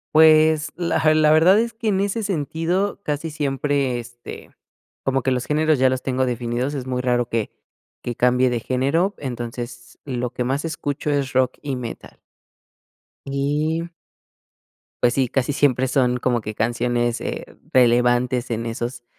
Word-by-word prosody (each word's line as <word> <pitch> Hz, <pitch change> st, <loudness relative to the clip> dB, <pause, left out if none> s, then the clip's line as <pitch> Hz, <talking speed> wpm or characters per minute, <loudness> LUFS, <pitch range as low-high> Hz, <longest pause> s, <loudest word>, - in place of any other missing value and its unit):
Pues, 155 Hz, -1 st, +5 dB
la 160 Hz, -3 st, +2 dB
la 155 Hz, -1 st, +4 dB
verdad 175 Hz, +6 st, +6 dB
es 230 Hz, 0 st, -1 dB
que 225 Hz, -1 st, -2 dB
en 195 Hz, -2 st, +1 dB
ese 205 Hz, +2 st, -1 dB
sentido 180 Hz, +3 st, -1 dB
casi 150 Hz, 0 st, -2 dB
siempre, 140 Hz, -3 st, -1 dB
este, 120 Hz, 0 st, -10 dB, 0.5 s
como 135 Hz, -1 st, +1 dB
que 130 Hz, -, 0 dB
los 125 Hz, -1 st, -1 dB
géneros 155 Hz, 0 st, +2 dB
ya 130 Hz, 0 st, +4 dB
los 130 Hz, 0 st, -1 dB
tengo 130 Hz, 0 st, 0 dB
definidos, 120 Hz, +3 st, -2 dB
es 130 Hz, -2 st, -4 dB
muy 125 Hz, -1 st, -2 dB
raro 120 Hz, -1 st, +1 dB
que 115 Hz, -3 st, -2 dB, 0.5 s
que 120 Hz, -, -4 dB
cambie 125 Hz, +2 st, +3 dB
de 120 Hz, -1 st, -1 dB
género, 140 Hz, -, 0 dB
entonces 120 Hz, -2 st, -6 dB
lo 125 Hz, -3 st, -3 dB
que 125 Hz, -, -2 dB
más 135 Hz, +5 st, -1 dB
escucho 150 Hz, -2 st, -3 dB
es 140 Hz, -1 st, 0 dB
rock 130 Hz, -1 st, +1 dB
y 140 Hz, -2 st, -3 dB
metal. 120 Hz, -2 st, -8 dB, 1.1 s
Y 150 Hz, +4 st, -1 dB, 1.2 s
Pues 120 Hz, -1 st, +4 dB
sí, 130 Hz, -2 st, +1 dB
casi 135 Hz, +3 st, -1 dB
siempre 130 Hz, -2 st, +2 dB
son 125 Hz, -1 st, +2 dB
como 120 Hz, -1 st, 0 dB
que 105 Hz, 0 st, -6 dB
canciones, 120 Hz, +1 st, 0 dB
eh, -, -, -4 dB, 0.3 s
relevantes 125 Hz, 0 st, +3 dB
en 115 Hz, 0 st, -2 dB
esos 120 Hz, +1 st, -4 dB
130 Hz, 155 wpm, -22 LUFS, 120-155 Hz, 1.2 s, verdad